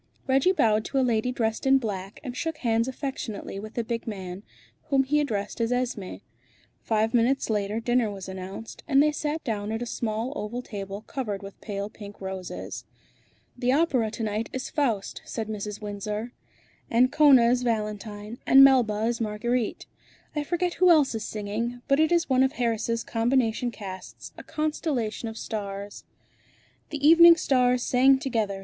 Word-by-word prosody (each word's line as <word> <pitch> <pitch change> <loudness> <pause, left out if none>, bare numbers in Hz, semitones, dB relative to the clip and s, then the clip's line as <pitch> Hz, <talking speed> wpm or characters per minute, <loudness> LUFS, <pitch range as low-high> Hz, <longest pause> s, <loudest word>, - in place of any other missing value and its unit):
Reggie 270 +7 +3
bowed 220 - +2
to 275 - -3
a 265 - +3
lady 235 0 +1
dressed 225 0 -1
in 270 0 +6
black, 200 -5 -5
and 250 -3 -6
shook 320 +3 -3
hands 230 -2 +1
affectionately 260 -7 -5
with 215 +2 -9
the 235 - -1
big 230 +1 -4
man, 190 -3 -6 0.4
whom 270 -2 +2
he 295 +3 +1
addressed 215 -6 -2
as 230 +1 0
Esmé. 235 - -2 0.6
Five 220 0 0
minutes 245 +1 +2
later 210 +1 -1
dinner 240 -1 +1
was 195 -2 -7
announced, 190 +3 -8
and 275 -3 +4
they 300 - +3
sat 300 +1 -3
down 215 -5 -3
at 225 +2 -2
a - - -4
small 230 +2 -3
oval 220 +4 -4
table 200 -2 -6
covered 215 -6 -4
with 195 0 -11
pale 200 -1 -4
pink 205 -1 -11
roses. 190 -1 -6 0.7
"The 250 0 +1
opera 270 -7 +2
to 225 - -5
night 215 +1 -2
is 260 - -5
'Faust,'" 235 -10 -1
said 220 -2 -5
Mrs. 210 -1 -5
Windsor. 210 +3 -4 0.6
"Ancona 255 0 +5
is 250 0 +2
Valentine, 215 -1 -3
and 270 +1 +9
Melba 240 -6 +4
is 235 0 -1
Marguerite. 225 +2 -1 0.5
I 300 - 0
forget 350 +3 -1
who 365 - +7
else 300 -6 +5
is 220 -1 -3
singing, 225 +4 -4
but 275 0 +3
it 315 +1 +3
is 340 -1 +3
one 260 -1 +3
of 265 +1 +3
Harris' 230 -3 -1
combination 235 0 +1
casts, 195 -5 -9
a - - -9
constellation 295 -8 -2
of 220 - -9
stars." 200 -2 -6 0.8
"The 290 -1 0
evening 335 +1 +9
stars 250 -4 +2
sang 265 +2 +5
together!" 225 -7 -2
230 Hz, 170 wpm, -26 LUFS, 210-265 Hz, 0.8 s, and